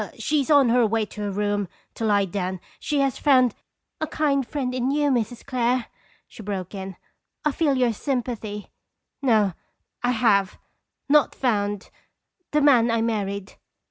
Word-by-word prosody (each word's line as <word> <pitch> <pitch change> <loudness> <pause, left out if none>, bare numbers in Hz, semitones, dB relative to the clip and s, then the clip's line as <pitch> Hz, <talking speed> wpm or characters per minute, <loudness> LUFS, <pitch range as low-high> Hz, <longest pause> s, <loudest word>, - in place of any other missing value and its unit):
She 300 -1 +1
is 275 - -5
on 285 -5 +6
her 245 +1 +4
way 220 0 0
to 210 - -9
her 205 - -2
room 205 0 -1 0.3
to 225 - -3
lie 205 -2 +3
down. 185 0 -3 0.2
She 290 -2 0
has 275 -2 0
found" 255 -5 +4 0.5
"A 315 - -2
kind 280 -5 0
friend 260 -4 -2
in 255 0 0
you, 290 0 +2
Mrs. 240 -1 -2
Clare," 250 -2 0 0.4
she - - -12
broke 195 -3 -5
in. 190 -1 -6 0.5
"I 300 - +3
feel 285 -2 +1
your 245 -2 +2
sympathy. 225 -5 -4 0.5
No 215 -8 +3 0.5
I 245 - +1
have 215 -5 +2 0.5
not 300 0 +4
found 205 -5 -1 0.6
the 300 - +2
man 250 -5 +5
I 230 -1 +1
married." 200 -3 -2
235 Hz, 160 wpm, -24 LUFS, 205-270 Hz, 0.6 s, on